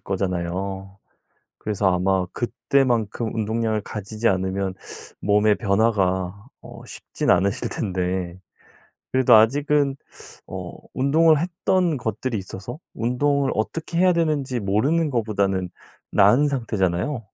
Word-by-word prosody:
거잖아요. 95 +1 -3 0.6
그래서 100 -3 0
아마 95 0 +1
그때만큼 120 -3 0
운동량을 110 -1 -1
가지지 110 +2 -3
않으면 95 0 -1 0.5
몸의 105 +1 +3
변화가 100 -2 0 0.2
어 - - -11
쉽진 - - -3
않으실 95 +2 +2
텐데 90 -3 -2 0.7
그래도 130 -3 +5
아직은 140 +5 +3 0.5
어 - - -7 0.2
운동을 155 +3 +4
했던 175 -1 0
것들이 115 +1 -3
있어서 100 - -7 0.2
운동을 135 +4 +1
어떻게 165 +9 -3
해야 185 0 +5
되는지 150 -7 0
모르는 135 +11 +1
거보다는 100 -6 0 0.4
나은 105 +9 +5
상태잖아요. 115 -1 -1
110 Hz, 275 characters per minute, -23 LUFS, 95-135 Hz, 0.7 s, 그래도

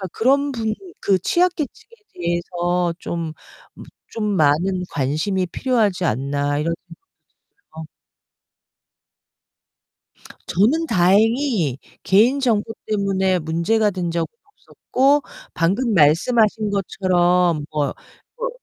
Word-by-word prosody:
아 190 - -4
'그런 280 +4 +2
분들 220 -3 -2 0.3
그 195 -2 +2
취약 355 - +2
계층에 310 +9 -7 0.2
대해서 175 0 -1
좀 165 -2 -4 0.4
무 - - -12 0.3
좀 220 -2 -2
많은 175 +5 +2
관심이 160 +7 -1
필요하지 210 -4 0
않나.' 140 +3 -1
이런 165 +2 -1 0.8
생각도 160 - -12
들어요. - - -39 2.6
저는 265 - +2
다행히 205 - +2 0.2
개인 235 +8 +3
정보 225 -4 0
때문에 195 -3 0
문제가 170 +7 +1
된 180 -3 -3
적은 165 -1 -1 0.2
없었고 285 -8 0 0.3
방금 200 +8 +1
말씀하신 210 +7 +3
것처럼 180 -4 +1
뭐 150 -2 -1 0.4
뭐 - - -2
190 Hz, 220 characters per minute, -21 LUFS, 170-225 Hz, 2.6 s, 개인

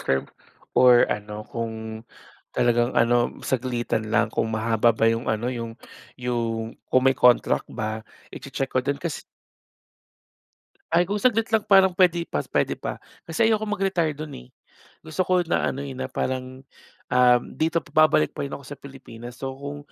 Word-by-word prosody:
term 65 0 0 0.5
or 125 -1 +6
ano 105 +1 -7
kung 110 0 -5 0.6
talagang 120 0 +2
ano 120 +1 +2
saglitan 120 -3 -1
lang 105 0 +1
kung 115 - 0
mahaba 110 +1 +2
ba - - +2
yung 115 +1 -3
ano 110 +3 -1
yung 115 -2 -6 0.4
yung 115 -2 -2 0.2
kung 130 - +3
may 135 - +5
contract 125 -2 +3
ba 110 0 -4 0.3
i-che-check 135 -1 -4
ko - - +2
din 140 +3 -1
kas 160 0 -4 1.7
Ay, 175 +1 +3
kung 205 - -1
saglit 225 0 +2
lang 220 -2 +1
parang 195 -2 +5
pwede 175 -2 +3
pa 75 - -2
pwede - - +1
pa. - - -6 0.2
Kasi 195 +8 +1
ayokong 215 -1 0
mag-retire 185 -5 +1
dun, 155 0 -7
eh. 60 - -13 0.5
Gusto 160 +3 -2
ko 185 0 +2
na 170 - +1
ano, 135 - -5
eh, 135 -2 -6
na 130 0 -4
parang, 130 0 -3 0.5
um, 125 -1 +5
dito 165 +2 +1
pa 155 +1 +3
babalik 155 0 +2
pa - - -4
rin 140 - -7
ako 140 - -7
sa 145 - -8
Pilipinas. 125 -3 -11
So, 135 -1 -4
kung 145 +1 -7
130 Hz, 165 wpm, -24 LUFS, 115-155 Hz, 1.7 s, or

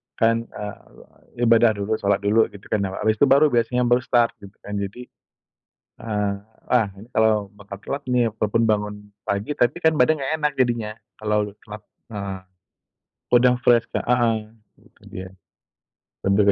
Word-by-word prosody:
Kan, 115 0 +1
eee, 105 +3 -10
ibadah 115 -1 +5
dulu, 100 +2 -2
sholat 100 0 +1
dulu 110 +2 +3
gitu 100 0 -12
kan, 110 - +2
awa 95 - -6
habis 110 0 +2
itu - - +6
baru 140 +3 +6
biasanya 120 +1 +1
baru 120 0 +3
start, 120 -1 +2
gitu 100 0 -14
kan. 105 - -7
Jadi, 100 +5 -5 1.0
eee, 105 -2 -1 0.3
ah, 120 -4 +3
ini 110 - -12
kalau 110 -2 +3
makan 100 -1 -10
telat 140 +6 -5
nih, 125 -1 +3
walaupun 110 +2 +1
bangun 105 -1 0 0.3
pagi, 100 +9 -2
tapi 120 +3 +1
kan 160 -2 +3
badan 150 +3 +3
nggak 135 +2 -2
enak 150 0 +2
jadinya, 120 -4 +1 0.2
kalau 105 -1 -1
telat, 105 0 -10 0.3
heeh. 100 -3 -5 1.0
Udah 125 +1 +5
fresh 120 -1 +4
Kak, - - -2
heeh, 120 -2 +2 0.5
itu - - -27
dia. 95 0 -7 1.0
Lebih 100 +1 +4
110 Hz, 160 wpm, -22 LUFS, 105-120 Hz, 1.0 s, itu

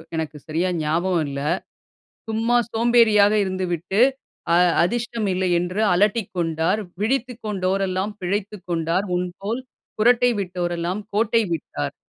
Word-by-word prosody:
எனக்கு 155 -2 -3
சரியா 165 +4 0
ஞாபகம் 165 +2 +1
இல்ல. 140 0 -4 0.9
"சும்மா 230 +2 +2 0.2
சோம்பேறியா 230 -3 +5 0.2
இருந்துவிட்டு. 185 +1 -1 0.5
அ - - +6 0.3
அதிஷ்டம் 235 +2 -1
இல்லை 185 0 0
என்று 180 +4 -2
அலட்டிக்கொண்டார். 185 -2 +1 0.2
விழித்துக் 250 +1 -1
கொண்டோர் 195 -1 0
எல்லாம் 190 +3 -2
பிழைத்துக் 200 +2 -3
கொண்டார். 170 +3 0
உன்போல், 195 +7 -4 0.4
குறட்டை 245 +2 +4
விட்டோரெல்லாம் 175 +1 -3
கோட்டை 225 +1 +3
விட்டார்." 75 - -4
190 Hz, 110 wpm, -22 LUFS, 175-220 Hz, 0.9 s, அ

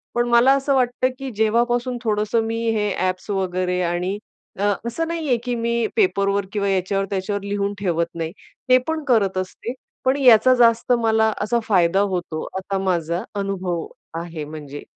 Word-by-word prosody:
पण 240 0 +1
मला 240 +2 +6
असं 275 0 0
वाटतं, 250 0 +1
की 270 -1 -4
जेव्हापासून 240 +3 +1
थोडंसं 215 0 +1
मी 225 +1 -2 0.2
हे 210 -1 0
ॲप्स 185 +2 -2
वगैरे 185 -2 -1
आणि 180 +3 -1 0.4
अ, 205 +1 +2 0.2
असं 330 +8 -2
नाही 330 -2 -3
आहे, 245 -3 +3
की 245 0 -2
मी 235 -1 0
पेपरवर 200 - +2
किंवा 200 -1 0
याच्यावर-त्याच्यावर 195 +1 -1
लिहून 200 0 -1
ठेवत 170 -4 0
नाही, 165 -1 -3 0.4
ते 255 - +8
पण 320 -1 -2
करत 200 -7 +2
असते. 185 +6 -4 0.3
पण 260 +2 +3
याचा 255 -2 +6
जास्त 235 0 +3
मला 220 0 +3
असा 235 +3 +1
फायदा 190 -3 +3 0.2
होतो, 170 -3 -4
आता 195 +1 -3
माझा 170 -2 0 0.2
अनुभव 185 -4 -2 0.3
आहे. 165 -2 -6
म्हणजे 145 -1 -8
205 Hz, 160 wpm, -22 LUFS, 185-240 Hz, 0.4 s, ते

